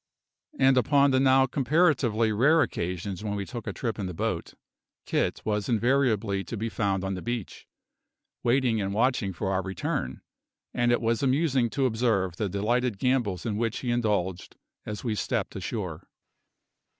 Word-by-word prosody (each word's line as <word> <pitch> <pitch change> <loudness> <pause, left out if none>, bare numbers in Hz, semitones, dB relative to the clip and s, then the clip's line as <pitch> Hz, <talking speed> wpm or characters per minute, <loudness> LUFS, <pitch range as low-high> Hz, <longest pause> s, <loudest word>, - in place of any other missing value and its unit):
And 135 -1 +4
upon 140 +1 +4
the 130 - +3
now 130 0 +5
comparatively 130 -5 +2
rare 145 +9 +4
occasions 90 +3 -4
when 105 -1 -2
we 100 -1 -3
took 120 +1 -7
a - - -1
trip 115 -3 -4
in 100 - -2
the 90 - -6
boat, - - -3 0.5
Kit - - -1
was 105 -2 -1
invariably 115 -5 +1
to 115 - -5
be 115 +3 -2
found 100 -4 -1
on 95 0 -2
the 90 - -5
beach, 120 -2 -5 0.7
waiting 120 -3 +2
and 100 0 -2
watching 115 -4 +1
for 95 +2 -3
our 95 0 +1
return; 95 0 -3 0.5
and 120 -1 +2
it 120 - +2
was 115 0 +1
amusing 135 -2 +2
to 135 +3 0
observe 110 -7 0
the 105 - -1
delighted 115 +4 0
gambols 120 -6 0
in 105 -3 -1
which 115 0 -1
he 125 - -1
indulged 100 -6 -1 0.3
as 105 -1 -5
we 115 -4 -1
stepped 105 - -2
ashore. - - -4
115 Hz, 165 wpm, -27 LUFS, 100-130 Hz, 0.7 s, now